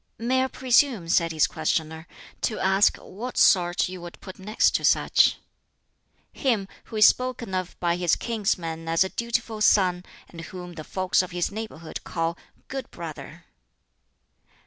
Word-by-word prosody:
"May 255 +3 +1
I - - 0
presume," 250 - +2
said 170 -1 +2
his 155 -2 +3
questioner, 160 0 -2 0.3
"to 220 - -1
ask 195 +2 +3
what 240 +6 -8
sort 175 -1 +4
you 185 -1 -8
would 175 0 -10
put 185 -1 -11
next 210 +3 +2
to - - -10
such?" - - +4 1.0
"Him 230 -8 0 0.2
who - - -10
is 215 - +7
spoken 250 -5 +1
of 185 -1 -3
by 175 -1 0
his 175 -2 +2
kinsmen 170 -8 -2
as 165 +3 +3
a 190 - -4
dutiful 230 -1 -3
son, 180 -4 +3 0.2
and 165 - -10
whom 180 +1 -9
the 160 -2 -8
folks 185 0 +1
of 185 - -6
his 175 +1 -2
neighborhood 205 -7 -7
call' 165 0 -2 0.3
good 270 0 -6
brother.'" - - -9
185 Hz, 155 wpm, -25 LUFS, 170-225 Hz, 1.0 s, is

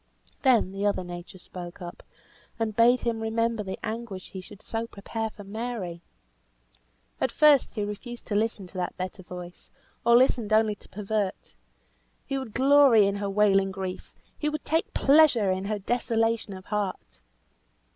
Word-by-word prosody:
Then 245 -8 +4
the 195 +1 -4
other 200 -2 0
nature 175 +1 -8
spoke 175 0 -9
up, 175 -2 -8 0.6
and 225 -2 -2
bade 240 +3 +5
him 230 -2 -1
remember 225 0 0
the 190 -2 -5
anguish 220 -4 -5
he 190 - -6
should 205 +2 -14
so 225 0 -3
prepare 220 +2 -4
for 210 - -12
Mary! 200 -5 -5 1.2
At - - +1
first 295 -3 +4
he 210 - -1
refused 235 +4 -6
to - - -4
listen 215 -2 0
to 185 - -11
that 180 - -3
better 185 +2 -5
voice; 180 -1 -10 0.3
or 235 0 +6
listened 240 -4 +2
only 215 0 +4
to 205 - -17
pervert. 210 -1 -3 0.7
He 275 -1 -2
would 245 -5 -8
glory 270 -5 +6
in 200 0 0
her 200 0 -2
wailing 195 -1 +3
grief! 190 -1 -6 0.3
he 300 - 0
would 305 0 -5
take 320 +1 0
pleasure 270 -9 +5
in 185 +1 -2
her 210 +1 -1
desolation 225 0 0
of 185 0 -10
heart! 205 -3 -4
215 Hz, 165 wpm, -27 LUFS, 195-235 Hz, 1.2 s, or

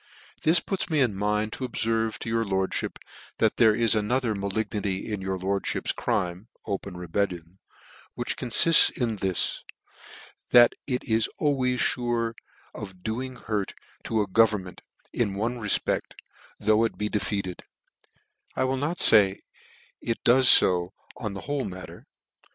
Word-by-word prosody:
"This 165 +2 +4
puts 190 0 -4
me 155 -2 +1
in 125 -6 +2
.mind 105 +2 -1
to - - -6
obferve 115 -2 -1
to - - -8
your 115 0 0
lordfhip, 95 -2 -2 0.4
that - - +1
there 110 -2 +5
is 115 -1 +2
another 110 +2 0
malignity 100 0 -3
in 100 - -4
your 95 0 -3
lordfhip's 95 +2 -2
crime, 90 +4 -2 0.2
(open 100 -2 -5
rebellion) 90 0 -3 0.6
which* - - -3
confifts 165 +7 +6
in 115 -4 -1
this, 95 -2 0 0.9
that 120 -1 +7
it 125 -3 -2
is 110 -1 +1
always 130 -4 0
fure 120 -2 -1 0.4
of 95 -3 -10
doing 125 +4 -4
hurt 105 -4 -4 0.3
to 110 -1 0
a 105 - -2
government, 100 -2 +1 0.3
in 105 -5 -1
one 115 +4 -2
refpect, 105 -3 -1 0.5
though 110 +2 +3
it 115 - -2
be 105 - -2
defeated 100 -3 -3
t - - -15 0.9
(I 130 - 0
will 130 +1 0
not 150 +6 -2
fay 100 -7 +5 0.6
it 115 - -3
does 125 +1 +6
fo 90 -1 +4 0.2
on 105 - -5
the 100 - -7
whole 145 0 -3
matter). 95 -1 -9
110 Hz, 145 wpm, -26 LUFS, 100-120 Hz, 0.9 s, that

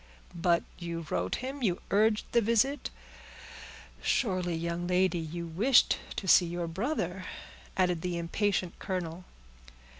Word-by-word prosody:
"But 170 0 +2 0.2
you 170 -1 -4
wrote 90 - 0
him—you 255 -10 -1
urged 215 +1 +3
the 235 - +4
visit; 235 +6 +2 1.1
surely, 185 -7 +1
young 170 +1 -2
lady, 180 -1 +2
you 170 +1 -5
wished 210 +11 +4 0.2
to 195 - -4
see 180 -1 +6
your 175 0 -3
brother?" 185 - -2 0.5
added 180 -3 +2
the 180 -1 -2
impatient 180 +1 -1
colonel. 180 -1 -4
180 Hz, 120 wpm, -30 LUFS, 170-205 Hz, 1.1 s, see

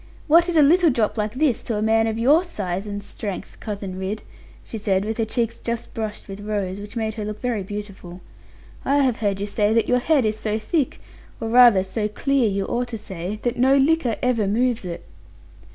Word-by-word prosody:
'What 340 +3 +5
is 340 - +1
a 305 - +7
little 340 +4 +5
drop 230 -6 0
like 210 0 -2
this 270 -4 +1
to 230 - -3
a - - -1
man 225 0 +3
of 220 0 -2
your 285 +9 +4
size 200 - -4
and 205 0 -5
strength, 200 -1 -6
Cousin 200 -3 -5
Ridd?' 195 +3 -4 0.4
she 225 - -7
said, 195 -1 0
with 220 +1 -3
her 225 - +2
cheeks 230 +1 -2
just 235 0 -4
brushed 215 -2 -5
with 195 0 -8
rose, 205 -2 -3
which 205 +4 -10
made 220 -1 -2
her 215 -1 -5
look 210 0 -5
very 240 -4 -1
beautiful; 195 -3 -8 0.6
'I 280 - +2
have 250 -4 +1
heard 200 -3 -1
you 200 - -2
say 210 +1 +1
that 230 - +2
your 250 - +3
head 275 -1 +2
is 215 0 -1
so 215 0 -1
thick 270 +6 -1 0.4
or 225 - -3
rather 235 -5 +7
so 210 +3 -2
clear, 260 +2 +1
you 195 0 -1
ought 245 +3 -2
to 235 -2 -5
say 190 0 -6
that 240 0 -1
no 265 +3 +4
liquor 275 -4 +2
ever 235 -5 +1
moves 235 +1 0
it.' 170 -1 -6
220 Hz, 215 wpm, -22 LUFS, 205-250 Hz, 0.6 s, a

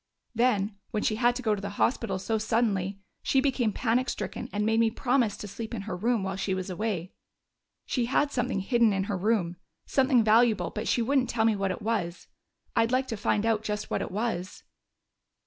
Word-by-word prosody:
"Then, 215 -4 +1
when 215 -2 -2
she 215 - +1
had 240 +1 +3
to 255 - -5
go 220 -2 +2
to 205 - -3
the 200 - -4
hospital 230 -6 +1
so 220 +4 -1
suddenly, 205 -4 0 0.2
she 270 - +2
became 260 -5 +1
panic 245 +3 +1
stricken 240 - -4
and 210 0 -1
made 225 +1 +2
me 230 -1 +4
promise 245 -2 +1
to 205 - -7
sleep 220 +4 -6
in 200 - -5
her 205 -2 -4
room 225 +3 0
while 190 0 -2
she 190 0 -1
was 185 0 -4
away. 185 -2 -3 0.7
She 245 -3 0
had 280 +4 +1
something 240 -6 -1
hidden 235 +1 +3
in 195 0 0
her 200 0 -2
room, 185 -3 0 0.3
something 260 -3 +3
valuable, 215 -4 +4
but 215 - -4
she 240 - +2
wouldn't 260 +1 +2
tell 225 -2 +1
me 225 -1 +3
what 195 -1 -1
it 185 - -4
was. 200 -6 -2 0.5
I'd 230 0 +3
like 260 +1 +1
to 225 - -2
find 210 0 0
out 225 -2 +2
just 210 -1 -3
what - - 0
it - - -3
was." 200 -3 -3
220 Hz, 210 wpm, -28 LUFS, 195-240 Hz, 0.7 s, me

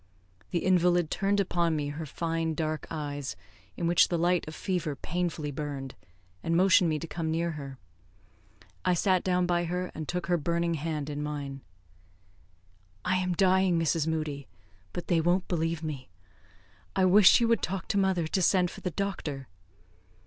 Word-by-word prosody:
The 175 - -1
invalid 175 -2 +3
turned 200 +2 +1
upon 170 -4 +1
me 145 -1 -2
her 155 +2 -5
fine 165 +1 -2
dark 155 0 -2
eyes, 145 - -4 0.4
in 170 - -2
which 170 0 +5
the 175 - -1
light 175 0 +1
of 155 - -7
fever 175 -6 -2
painfully 160 -1 -3
burned, 140 -2 -5 0.5
and 165 +8 0
motioned 185 -1 +5
me 155 - 0
to 165 - -5
come 165 0 -3
near 165 +1 0
her. 140 -3 -7 1.1
I 180 -1 +2
sat 185 +1 +2
down 180 -1 +2
by 175 0 +1
her, 180 +2 -3
and 155 -2 -6
took 180 0 -2
her 175 0 +2
burning 170 +2 0
hand 155 -2 -3
in 145 -1 -4
mine. 140 -2 -5 1.4
"I 185 0 +2
am 185 -1 0
dying, 185 -1 +3
Mrs. 165 -1 +1
Moodie, 155 -4 -2 0.4
but 175 - -5
they 170 -2 +2
won't 175 +3 +1
believe 165 -1 -1
me. 145 -7 -5 0.9
I 190 -1 +3
wish 190 +4 +7
you 235 - +2
would 230 -5 +3
talk 185 +1 -3
to 200 - +1
mother 190 -4 +1
to 185 +4 0
send 180 0 +3
for - - -11
the 180 - -2
doctor." 155 -7 -4
170 Hz, 170 wpm, -29 LUFS, 155-180 Hz, 1.4 s, wish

